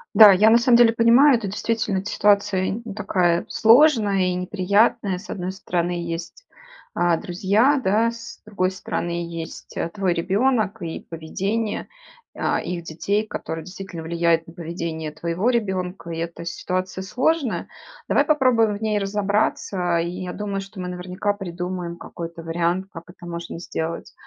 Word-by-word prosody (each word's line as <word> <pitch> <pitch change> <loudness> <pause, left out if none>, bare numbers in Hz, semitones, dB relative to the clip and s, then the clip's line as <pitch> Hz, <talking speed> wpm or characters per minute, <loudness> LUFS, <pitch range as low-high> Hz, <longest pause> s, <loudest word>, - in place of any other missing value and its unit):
Да, 210 -3 +10
я 215 +4 +5
на 230 - +7
самом 240 0 +5
деле 235 -1 +6
понимаю, 235 +4 +5
это 210 -3 -5
действительно 210 -1 -1
т 210 - -6
ситуация 200 0 +2
такая 180 -5 +1
сложная 220 -7 +4
и - - -1
неприятная: 200 +2 +1
с 205 - -12
одной 185 0 -4
стороны, 175 -2 -2
есть, 170 - -5 0.5
а, 175 -1 +2
друзья, 205 - +2
да, 220 +4 +2
с 230 -1 -10
другой 190 -3 -1
стороны, 175 -2 -4
есть 165 -1 -8 0.2
твой 190 -4 0
ребенок 210 +4 +1
и 165 -1 -4
поведение, 195 +7 -3 0.5
а, - - 0
их 175 -2 -4
детей, 200 +7 -1
которое 160 -4 -5
действительно 180 -2 -8
влияет 170 0 +1
на 165 - -12
поведение 165 -2 -5
твоего 170 +8 -1
ребенка, 190 -6 -2
и 165 - -4
эта 170 0 -5
ситуация 185 +2 -3
сложная. 265 +5 0 0.4
Давай - - +4
попробуем 240 -8 +3
в - - -16
ней 215 -1 +1
разобраться, 195 -3 0
и 175 +2 -3
я 180 - -4
думаю, 200 -2 -3
что 195 0 -11
мы 180 - -4
наверняка 180 +3 -2
придумаем 180 -2 -5
какой-то 170 -1 -8
вариант, 170 +3 -1
как 165 - -8
это 175 -1 -13
можно 170 -1 -6
сделать. 165 -1 -5
190 Hz, 150 wpm, -23 LUFS, 170-215 Hz, 0.5 s, Да